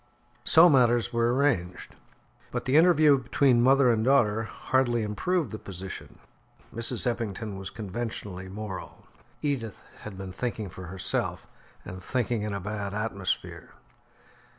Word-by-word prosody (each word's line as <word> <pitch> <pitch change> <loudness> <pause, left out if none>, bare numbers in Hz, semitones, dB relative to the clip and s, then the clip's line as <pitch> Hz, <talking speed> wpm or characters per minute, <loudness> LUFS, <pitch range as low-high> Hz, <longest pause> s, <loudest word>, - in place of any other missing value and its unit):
So 165 +6 +7
matters 120 -5 +3
were 115 0 +2
arranged, 125 -10 0 0.6
but - - -4
the 130 +2 +1
interview 155 -4 +6
between 125 0 +3
mother 130 0 +5
and 110 -1 +1
daughter 110 -4 +3
hardly 120 0 0
improved 130 - -1
the 110 - -6
position. 95 0 -8 0.6
Mrs. 115 +1 -2
Eppington 110 -3 -3
was 95 -1 -6
conventionally 105 -3 -6
moral; 95 -4 -7 0.4
Edith 130 -8 -2 0.2
had 105 -3 -9
been 95 -1 -6
thinking 110 -2 -3
for 90 0 -9
herself, 95 +2 -3 0.4
and 90 0 -8
thinking 120 +2 -1
in 105 0 -3
a - - -3
bad 100 +1 -4
atmosphere. 105 -3 -3
115 Hz, 130 wpm, -27 LUFS, 100-130 Hz, 0.6 s, So